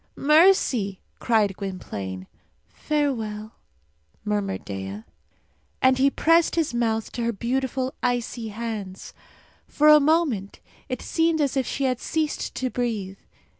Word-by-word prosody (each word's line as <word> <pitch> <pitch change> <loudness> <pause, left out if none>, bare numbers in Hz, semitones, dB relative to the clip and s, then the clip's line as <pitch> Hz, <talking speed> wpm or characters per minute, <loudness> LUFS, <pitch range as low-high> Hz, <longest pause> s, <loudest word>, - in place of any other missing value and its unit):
"Mercy!" 285 - +3 0.2
cried 215 -5 +2
Gwynplaine. 100 - -6 0.4
"Farewell!" 225 -8 -2 0.7
murmured 205 -2 -2
Dea. 95 +1 -6 0.8
And 260 0 +3
he 275 +1 +5
pressed 330 +4 +3
his 325 -6 0
mouth 225 -2 -1
to 240 - -5
her 235 - +1
beautiful 260 +4 -2
icy 245 -2 -1
hands. 210 -3 -6 0.5
For 300 +1 +3
a 300 0 +9
moment 285 - +1 0.3
it 255 - -4
seemed 325 -1 +1
as 280 -3 +1
if 265 -2 0
she 275 - -2
had 255 -2 0
ceased 315 -2 -2
to 255 -1 -2
breathe. 210 -6 -3
240 Hz, 125 wpm, -24 LUFS, 205-280 Hz, 0.8 s, a